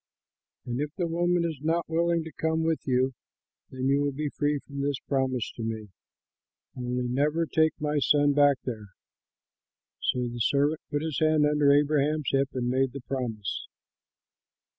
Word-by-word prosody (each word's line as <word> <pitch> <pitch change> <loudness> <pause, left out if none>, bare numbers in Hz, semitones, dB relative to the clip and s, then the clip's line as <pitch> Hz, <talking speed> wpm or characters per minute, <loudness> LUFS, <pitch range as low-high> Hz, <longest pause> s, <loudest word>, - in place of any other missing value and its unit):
But 120 +1 -3
if 150 - -1
the 180 - -1
woman 175 +1 +1
is 160 -4 -3
not 165 +2 0
willing 170 0 +1
to 160 - -8
come 160 +2 -1
with 160 -1 +1
you, 130 0 +2 0.6
then 130 0 -4
you 140 +1 +3
will 145 0 +1
be 150 +2 -3
free 145 +1 0
from 140 0 -7
this 140 -1 0
promise 130 -3 0
to - - -9
me; 110 -2 -4 0.9
only 125 0 -2
never 150 +6 +1
take 160 0 +1
my 150 -1 0
son 145 0 +3
back 145 -1 +5
there." 110 -5 -5 1.1
So 125 -1 0
the 120 0 -6
servant 145 +6 +2
put 145 0 -1
his 160 -3 -2
hand 155 -1 +4
under 150 -1 +4
Abraham's 150 +1 +2
hip 135 0 +2
and 125 -2 -2
made 130 +1 +1
the 140 - -6
promise. 120 -7 -4
145 Hz, 165 wpm, -27 LUFS, 130-155 Hz, 1.1 s, back